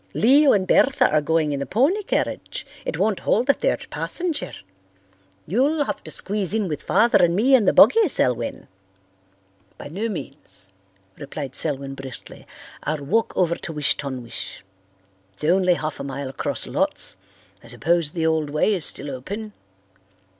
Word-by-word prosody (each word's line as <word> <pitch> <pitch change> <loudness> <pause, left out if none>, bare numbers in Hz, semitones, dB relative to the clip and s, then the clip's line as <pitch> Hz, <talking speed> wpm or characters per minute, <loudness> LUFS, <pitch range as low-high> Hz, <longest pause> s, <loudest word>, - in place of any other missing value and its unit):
Leo 275 +5 +5
and 190 -2 +2
Bertha 270 +6 +4
are 155 0 +3
going 155 0 +1
in 140 - -2
the 140 - -3
pony 290 - +2
carriage. 410 - -3 0.2
It - - -2
won't 215 -3 +1
hold 245 +6 +2
a - - -1
third - - -1
passenger. 345 -4 -2 0.9
You'll 280 - +1
have - - -5
to - - -6
squeeze 200 0 0
in 215 -3 0
with 150 -3 -4
Father 230 -4 +3
and 170 0 +3
me 245 +8 +3
in 245 -6 +5
the - - +5
buggy, 450 -3 +6
Selwyn." 120 - 0 1.1
"By - - -9
no 205 +9 -3
means," 95 - -5 0.5
replied 140 -2 -6
Selwyn 140 -2 -2
briskly. 135 -3 -9 0.3
"I'll 150 -1 -3
walk 225 +10 +1
over 175 -2 +2
to 170 - -6
Wish 150 -1 +2
ton 130 -3 -5
wish. 100 -5 -7 0.7
Ifs - - -12
only 180 +2 +3
half 155 -2 -4
a - - -4
mile 140 0 -5
across 135 - 0
lots. - - -2 0.5
I - - -14
suppose 155 +6 0
the 165 -2 -1
old 160 -2 +1
way 155 +8 +1
is 180 -6 -1
still 145 +1 +3
open?" 200 - -6
165 Hz, 165 wpm, -22 LUFS, 140-220 Hz, 1.1 s, buggy